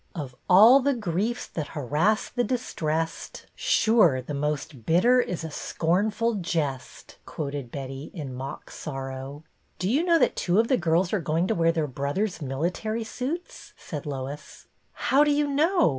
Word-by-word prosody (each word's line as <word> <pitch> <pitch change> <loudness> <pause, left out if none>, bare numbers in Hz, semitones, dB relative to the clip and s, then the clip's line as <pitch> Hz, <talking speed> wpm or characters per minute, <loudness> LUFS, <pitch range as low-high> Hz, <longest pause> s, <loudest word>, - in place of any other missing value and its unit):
" - - -39
' - - -38
Of 140 -6 -5 0.2
all 220 +9 +8
the 280 0 +1
griefs 215 +3 -2
that 155 -3 -4
harass 150 - +1
the 245 - -1
distrest, 165 -11 -3
Sure 210 - +3
the 130 +3 -6
most 145 -3 -3
bitter 215 - +4
is 175 -7 -4
a 160 - -5
scornful 205 +10 0
jest,'" 155 -7 -4
quoted 140 -4 -5
Betty, 135 +1 -6
in 145 -7 -6
mock 135 +2 -7
sorrow. 135 0 -6 0.2
" - - -42
Do 185 - -2
you 275 - +2
know 340 -2 +4
that - - +2
two 180 +1 +1
of 230 - +2
the 260 - +4
girls 170 +2 +1
are 205 - +1
going 165 +2 0
to - - +3
wear 165 -3 +3
their 165 -2 0
brothers' 145 - -2
military 175 - -2
suits.'* 270 +10 -6
" - - -40
said 150 -3 -7
Lois. 140 +1 -6 0.3
"How 275 +3 +3
do 300 - +2
you 295 0 +2
know? 315 +5 +3
170 Hz, 175 wpm, -26 LUFS, 145-230 Hz, 0.3 s, all